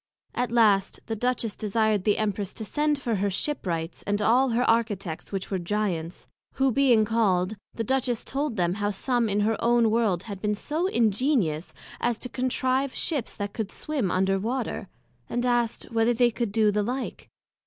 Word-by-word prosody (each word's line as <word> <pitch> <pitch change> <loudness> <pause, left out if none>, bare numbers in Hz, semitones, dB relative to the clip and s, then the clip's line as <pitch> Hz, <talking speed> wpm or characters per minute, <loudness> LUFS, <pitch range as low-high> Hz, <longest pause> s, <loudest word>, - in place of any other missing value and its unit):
At 245 -2 -1
last 210 -5 +3
the 225 - -3
Duchess 235 -1 -1
desired 215 -2 +1
the 210 - +3
Empress 205 -2 -2
to 220 - -5
send 295 +5 +1
for 235 -5 -1
her 200 +1 +1
Ship 290 +9 -2
wrights, 165 -1 -3
and 205 0 +1
all 245 +5 +4
her 240 +1 +1
Architects, 205 -7 0
which 195 0 -4
were 190 - 0
Giants; 175 -3 -2 0.3
who 270 -1 +2
being 245 -4 +4
called, 205 -3 +1 0.2
the 230 - -2
Duchess 245 -1 0
told 275 -2 -2
them 175 -3 +1
how 205 +1 -1
some 235 +3 0
in 205 +1 +1
her 220 +2 0
own 235 -1 +4
World 215 -6 +1
had 200 -4 -7
been 210 -1 0
so 315 - -1
ingenious, 220 - +1 0.3
as 240 -2 0
to 250 - -7
contrive 255 +1 0
Ships 285 -9 -2
that 205 -1 -4
could 215 -3 -4
swim 280 -11 -2
under 190 +1 +1
Water, 235 -1 -3 0.4
and 240 +1 -1
asked, 240 -2 +1
Whether 230 +1 +2
they 240 0 +4
could 235 -2 -2
do 215 0 +3
the 210 +1 +1
like? 250 +5 -4
225 Hz, 185 wpm, -26 LUFS, 200-245 Hz, 0.4 s, all